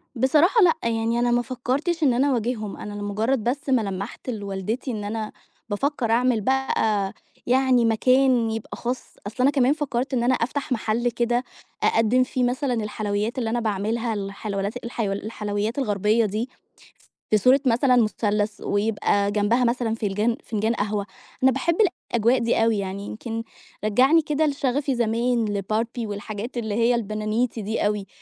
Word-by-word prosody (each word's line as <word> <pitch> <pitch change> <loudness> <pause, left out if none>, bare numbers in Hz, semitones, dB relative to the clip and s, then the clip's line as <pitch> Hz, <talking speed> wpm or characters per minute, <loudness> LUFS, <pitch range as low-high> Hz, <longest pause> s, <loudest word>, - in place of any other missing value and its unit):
بصراحة 305 - +4
لأ، 335 -4 +5
يعني 230 +1 0
أنا 240 0 +2
ما 240 0 +3
فكّرتش 265 +7 -2
إن 265 -4 +4
أنا 265 +4 +2
أواجههم، 230 -4 -2
أنا 210 - -7
لمُجّرد 210 +4 -1
بس 275 +5 -2
ما 255 -3 +4
لمَّحت 200 +4 -5
لوالدتي 210 +3 -3
إن 215 -3 -4
أنا 215 +1 -4 0.4
بافكّر 240 +2 -1
أعمل 240 -1 +2
بقى 220 -5 +1 0.3
يعني 255 -1 +3
مكان 250 +1 +3
يبقى 225 -1 -5
خاص، 245 +1 -4
أصل 210 - -8
أنا 275 - +5
كمان 270 -1 +3
فكّرت 270 -4 -2
إن 240 -2 +1
أنا 250 +2 +3
أفتح 265 +4 -3
مَحَل 235 0 0
كده 240 +1 0 0.4
أقدِّم 225 +3 +3
فيه 255 0 -2
مثلًا 250 +2 0
الحلويات 210 0 -2
اللي 235 -3 -1
أنا 240 +2 0
باعملها، 220 +2 -1
الحلويات 200 +2 -4
الحيول 220 -4 -2
الحلويات 210 +1 -3
الغربية 210 -1 +2
دي 215 +5 -2 0.8
في 215 - +6
صورة 255 +7 +5
مثلًا 250 +1 +3
مُثَلَّث 210 -2 0
ويبقى 205 -1 +1
جنبها 210 +4 +2
مثلًا 235 -2 0
فنجان- 215 +2 0
فنجان 220 +1 -1
قهوة. 205 -1 -2 0.4
أنا 265 - +6
باحب 335 +6 0 0.4
الأجواء 235 +2 +3
دي 230 -1 +2
أوي، 225 -1 +2
يعني 195 +1 -4
يمكن 225 +2 -5 0.4
رجّعني 260 +10 +4
كده 305 0 0
لشَغَفي 275 -1 0
زمان 235 0 +1
لBarbie 225 +4 -2
والحاجات 210 +4 -6
اللي 220 -3 -2
هي 235 +2 +3
البنانيتي 215 +1 -1
دي 215 +2 -1
أوي. 205 -1 -2
230 Hz, 155 wpm, -24 LUFS, 210-255 Hz, 0.8 s, في